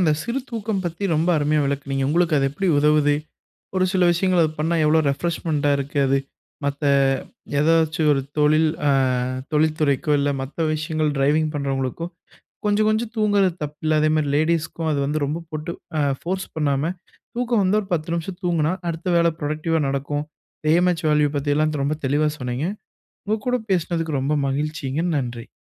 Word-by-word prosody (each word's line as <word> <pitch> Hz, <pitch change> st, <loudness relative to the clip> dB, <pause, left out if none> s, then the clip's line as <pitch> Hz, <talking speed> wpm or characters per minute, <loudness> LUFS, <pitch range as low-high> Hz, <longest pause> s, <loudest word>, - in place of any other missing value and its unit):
இந்த 160 Hz, -4 st, +4 dB
சிறு 245 Hz, +3 st, -2 dB
தூக்கம் 220 Hz, -4 st, -2 dB
பத்தி 175 Hz, +3 st, -3 dB
ரொம்ப 160 Hz, +3 st, +1 dB
அருமையா 150 Hz, +1 st, +2 dB
விளக்குனீங்க. 140 Hz, -1 st, -2 dB
உங்களுக்கு 170 Hz, +1 st, +2 dB
அது 135 Hz, -, +2 dB
எப்படி 190 Hz, +8 st, -3 dB
உதவுது? 150 Hz, 0 st, +4 dB, 0.6 s
ஒரு 185 Hz, 0 st, +3 dB
சில 185 Hz, -2 st, +2 dB
விஷயங்கள் 180 Hz, 0 st, +2 dB
அது 155 Hz, -, 0 dB
பண்ணா 165 Hz, +2 st, +1 dB
எவ்ளோ 160 Hz, +1 st, +4 dB
ரெஃப்ரெஷ்மெண்ட்டா 150 Hz, -1 st, 0 dB
இருக்கு 140 Hz, +1 st, -4 dB
அது? 135 Hz, +1 st, +3 dB, 0.5 s
மத்த 140 Hz, +1 st, -2 dB, 0.8 s
ஏதாச்சும், 160 Hz, 0 st, +3 dB
ஒரு 135 Hz, -, +2 dB, 0.2 s
தொழில் 155 Hz, +1 st, +4 dB, 0.2 s
அ -, -, +4 dB, 0.6 s
தொழில்துறைக்கோ, 150 Hz, -1 st, +1 dB
இல்ல 145 Hz, 0 st, +1 dB
மத்த 135 Hz, +2 st, -8 dB, 0.2 s
விஷயங்கள் 155 Hz, 0 st, -1 dB
ட்ரைவிங் 150 Hz, +3 st, +2 dB
பண்ணுறவங்களுக்கோ, 135 Hz, +2 st, -2 dB, 0.6 s
கொஞ்சம் 210 Hz, +1 st, +2 dB
கொஞ்சம் 220 Hz, +1 st, 0 dB
தூங்கறது 205 Hz, -4 st, +2 dB
தப்பில்ல. 155 Hz, +1 st, -1 dB
அதேமாதிரி 155 Hz, -1 st, +2 dB
லேடீஸுக்கும், 160 Hz, 0 st, 0 dB
அது 145 Hz, -, 0 dB
வந்து 150 Hz, +2 st, -1 dB
ரொம்ப 155 Hz, +4 st, -3 dB
போட்டு 155 Hz, +2 st, -4 dB, 0.5 s
ஃபோர்ஸ் 190 Hz, +2 st, -3 dB
பண்ணாம, 150 Hz, +1 st, 0 dB, 0.4 s
தூக்கம் 240 Hz, -4 st, +1 dB
வந்து 195 Hz, +3 st, +3 dB
ஒரு 195 Hz, -, -10 dB
10 165 Hz, 0 st, -1 dB
நிமிஷம் 175 Hz, +2 st, -5 dB
தூங்குனா 170 Hz, -1 st, +1 dB, 0.2 s
அடுத்த 165 Hz, +2 st, -5 dB
வேலை 170 Hz, 0 st, +3 dB
ப்ரோடக்டிவா 155 Hz, +1 st, -1 dB
நடக்கும். 145 Hz, +2 st, -2 dB, 0.5 s
ஏஎம்எச் 175 Hz, 0 st, +2 dB
வேல்யூ 150 Hz, -1 st, +3 dB
பத்தி 145 Hz, +1 st, -1 dB
எல்லாம் 155 Hz, 0 st, +1 dB
ரொம்ப 150 Hz, +2 st, -1 dB
தெளிவா 145 Hz, +3 st, +2 dB
சொன்னீங்க. 125 Hz, +4 st, -2 dB, 0.6 s
உங்க 215 Hz, +1 st, 0 dB
கூட 250 Hz, -, +2 dB, 0.2 s
பேசினதுக்கு 165 Hz, -4 st, 0 dB
ரொம்ப 135 Hz, +3 st, 0 dB
மகிழ்ச்சிங்க. 145 Hz, +1 st, -2 dB
நன்றி. 120 Hz, -4 st, -4 dB
155 Hz, 155 wpm, -22 LUFS, 145-170 Hz, 0.8 s, இந்த